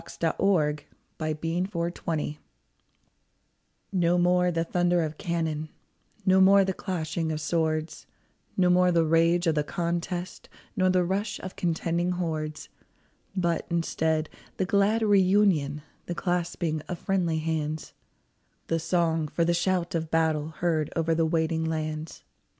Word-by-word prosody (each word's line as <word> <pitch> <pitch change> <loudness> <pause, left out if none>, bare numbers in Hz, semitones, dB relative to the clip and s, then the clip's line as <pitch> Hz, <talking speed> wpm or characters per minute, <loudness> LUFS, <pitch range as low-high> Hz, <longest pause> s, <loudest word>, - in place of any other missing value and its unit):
" - - -15
"NO 165 - +3
MORE 150 -7 +1
THE - - -42 0.3
THUNDER 170 +4 -2
OF 170 0 -2
CANNON" 150 -2 -3 1.5
No 175 -1 +3
more 180 0 +3
the 165 -1 0
thunder 175 0 +1
of 155 -1 -5
cannon, 160 -3 -2 0.6
No 190 0 +5
more 195 +1 +6
the 190 - -1
clashing 165 -3 -3
of 155 - -2
swords, 155 0 -1 0.5
No 180 -2 +4
more 180 0 +4
the 165 -1 +3
rage 165 +2 +3
of 165 - +3
the 150 -1 +1
contest, 175 +3 -3 0.3
Nor 185 -1 +3
the 185 -1 +3
rush 200 +4 -1
of 185 - -7
contending 170 +1 0
hordes; 155 -4 -3 0.7
But, 170 -3 0
instead, 160 -2 0 0.3
the 190 - +1
glad 200 +4 +2
reunion, 190 -8 +3 0.2
The 175 - -3
clasping 175 -3 -1
of 175 - -4
friendly 175 -3 0
hands, 155 -1 -3 0.8
The 165 - +1
song, 165 -2 +1
for 170 +3 0
the 170 - +2
shout 175 0 0
of 160 -2 -2
battle, 160 -2 +1
Heard 160 -1 -1
over 165 0 +1
the 160 0 +2
waiting 160 0 0
lands. 155 -1 -4
170 Hz, 145 wpm, -27 LUFS, 160-180 Hz, 1.5 s, more